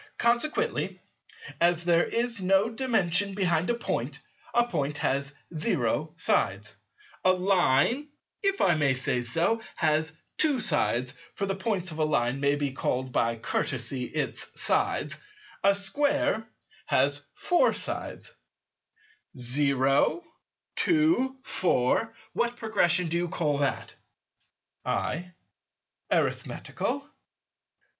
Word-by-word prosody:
Consequently, 305 - 0 0.6
as 170 0 +2
there 170 -1 +4
is 235 -2 +2
no 195 +4 +3
Dimension 205 -6 +1
behind 175 -3 +1
a 240 - +2
Point, 235 - -3 0.3
a 240 0 +3
Point 150 -10 -2
has 140 0 0 0.2
0 155 0 0
sides; 165 - +1 0.5
a 185 - +6
Line, 185 - +2 0.3
if 395 -1 +1
I 175 - +5
may 145 -4 +2
so 125 -1 0
say, 165 - +1 0.2
has 155 0 +1 0.3
2 295 -4 +3
sides 130 - +1 0.2
(for 200 - -1
the 195 - -1
points 190 -2 -1
of 155 - -7
a - - +3
Line 130 -4 +1
may 140 +1 +2
be 145 -1 -1
called 130 -1 -2
by 115 -1 +1
courtesy, 125 +1 -2
its 150 +4 -4
sides); - - +1 0.4
a 200 0 +5
Square 280 +3 0 0.4
has 145 +2 +2
4 355 +8 +3
sides; - - -5 1.0
0, 135 - +2 0.5
2, 305 -5 +2
4; 185 - +1 0.2
what 240 0 -1
Progression 185 -6 +2
do 165 +1 -1
you 175 0 0
call 150 -4 -1
that? 140 -2 -1 0.9
I. 180 +3 -2 0.8
Arithmetical. 280 0 -1
175 Hz, 115 wpm, -27 LUFS, 140-225 Hz, 1.0 s, a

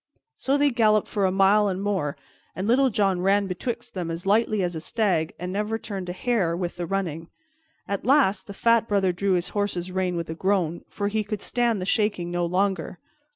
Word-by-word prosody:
So 275 +2 0
they 285 0 +3
galloped 215 -3 +3
for 200 -2 0
a - - 0
mile 195 +2 +4
and 190 -1 -2
more, 195 -8 -1 0.4
and 190 +2 -3
Little 260 +3 +4
John 195 -5 +1
ran 200 +2 +3
betwixt 195 +6 -5
them 180 -3 -4
as 165 +3 -5
lightly 215 0 +2
as 175 -1 -2
a 160 - -4
stag 180 -5 0
and 180 +1 -5
never 210 +2 -1
turned 195 -5 -6
a - - -1
hair 185 -4 0
with 175 -1 -4
the 175 -1 -3
running. 165 -4 -3 0.6
At 200 -1 -3
last 225 -8 +3
the 200 - -7
fat 230 +1 +3
Brother 195 -3 +2
drew 190 +2 0
his 175 -1 0
horse's 190 -3 -2
rein 185 -1 -1
with 170 -1 -4
a - - -2
groan, 175 -1 0
for 205 - -3
he 215 +1 0
could 210 0 -5
stand 240 -3 0
the 185 - -3
shaking 200 -4 0
no 175 -1 0
longer. 185 -1 -1
195 Hz, 210 wpm, -25 LUFS, 180-210 Hz, 0.6 s, mile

